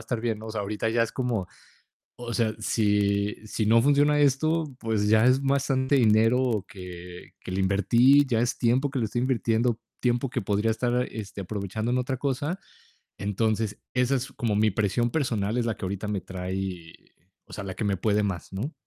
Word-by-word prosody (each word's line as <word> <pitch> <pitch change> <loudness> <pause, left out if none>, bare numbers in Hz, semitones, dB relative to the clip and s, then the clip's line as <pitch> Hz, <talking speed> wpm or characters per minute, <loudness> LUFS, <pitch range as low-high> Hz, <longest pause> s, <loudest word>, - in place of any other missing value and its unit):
estar 115 0 -3
bien". 110 -2 -2
No, 110 - -8
o - - -6
sea, 110 -1 -3
ahorita 105 +2 -2
ya 115 +1 +2
es 115 - -7
como, 120 -7 -1 0.7
o 120 -1 -6
sea, 110 -2 +1
si 105 -2 +1
si 110 0 -2
no 115 +2 +5
funciona 145 +2 +4
esto, 150 +2 +1
pues, 110 -2 0
ya 110 +2 +5
es 130 +2 +4
bastante 135 0 +1
dinero 115 -1 +3
que 90 -1 -10
que - - -8
le 95 +1 -1
invertí, 115 +9 +4
ya 120 -4 +1
es 120 +1 0
tiempo 130 +4 +1
que 135 - -3
le - - +1
estoy 120 +3 -2
invirtiendo, 120 -2 +1 0.2
tiempo 125 +1 0
que 125 - -2
podría 105 +2 0
estar, 125 +2 0
este, 100 -2 -6
aprovechando 105 +3 -3
en 125 - +1
otra 125 +1 -2
cosa. 145 +6 -2 0.6
Entonces, 105 +1 -1 0.2
esa 125 +2 +2
es 130 +1 -4
como 110 -4 -1
mi 110 +1 +3
presión 110 +4 +1
personal, 115 -7 -1
es 120 - +1
la 115 - 0
que - - -7
ahorita 100 +2 -4
me 105 -2 -1
trae, 90 -2 -5 0.5
o - - -16
sea, 100 - -6
la 95 - -5
que 110 - -4
me 100 -1 +1
puede 105 +2 +1
más, 95 -5 -4
¿no? 110 +11 -4
110 Hz, 195 wpm, -26 LUFS, 100-125 Hz, 0.7 s, no